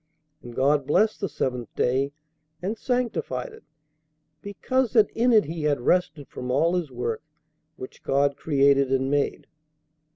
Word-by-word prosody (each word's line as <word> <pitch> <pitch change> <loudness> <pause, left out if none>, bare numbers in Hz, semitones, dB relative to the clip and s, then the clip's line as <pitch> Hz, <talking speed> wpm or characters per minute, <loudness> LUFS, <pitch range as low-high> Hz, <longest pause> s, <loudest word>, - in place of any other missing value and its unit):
And 120 -1 -11
God 140 +1 +2
blessed 215 +9 +2
the 195 - -1
seventh 125 -5 -3
day, 135 +3 +1 0.5
and 190 +6 -3
sanctified 250 - -2
it: 445 - -15 0.8
because 250 +5 -1
that 220 -4 +4
in 245 +2 +2
it 220 -2 +6
he 160 +2 -5
had 150 -2 +1
rested 150 -1 0
from 125 0 -7
all 155 +7 +2
his 175 -5 -1
work 120 -2 -3 0.5
which 130 - -10
God 140 +1 +1
created 140 -2 +2
and 135 0 +1
made." 145 -1 0
145 Hz, 150 wpm, -25 LUFS, 135-205 Hz, 0.8 s, it